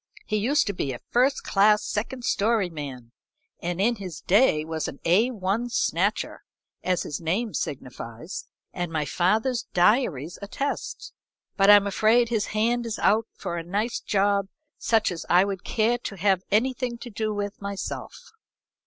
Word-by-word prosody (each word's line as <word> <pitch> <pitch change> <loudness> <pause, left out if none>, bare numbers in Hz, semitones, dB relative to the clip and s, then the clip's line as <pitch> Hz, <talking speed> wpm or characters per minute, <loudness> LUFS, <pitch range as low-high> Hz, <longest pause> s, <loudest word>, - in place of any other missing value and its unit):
He 215 - 0
used 255 +8 +2
to 200 - -2
be 140 -7 -2
a 120 - -7
first 255 +3 +2
class 210 +1 +4
second 245 +4 -3
story 210 -3 +1
man, 135 -6 -7 0.5
and 175 +1 -3
in 230 +4 +2
his 180 -6 -7
day 190 -6 +3
was 160 -1 -3
an - - -8
A 195 +9 +4
1 220 +1 -2
snatcher, - - 0 0.4
as 180 -1 +1
his 150 - -5
name 195 +7 -1
signifies 125 +2 -5 0.3
and 175 -2 -3
my 155 -2 -1
father's 220 - +1
diaries 175 - +2
attest, 275 +8 -4 0.4
but 195 0 +4
I'm 205 -1 +8
afraid 220 +4 +3
his 220 -3 0
hand 235 +3 0
is 220 - -3
out 220 +2 +2
for 170 - -4
a 165 - -4
nice 205 +7 -1
job 200 -1 +1 0.3
such 225 -4 +2
as 170 - -5
I 180 +2 +5
would 195 -2 -4
care 235 +2 +1
to 210 - -6
have 190 0 +2
anything 245 +2 0
to 240 0 -9
do 215 +1 -2
with 205 -1 -4
myself." 200 -1 -6
205 Hz, 160 wpm, -25 LUFS, 175-230 Hz, 0.5 s, I'm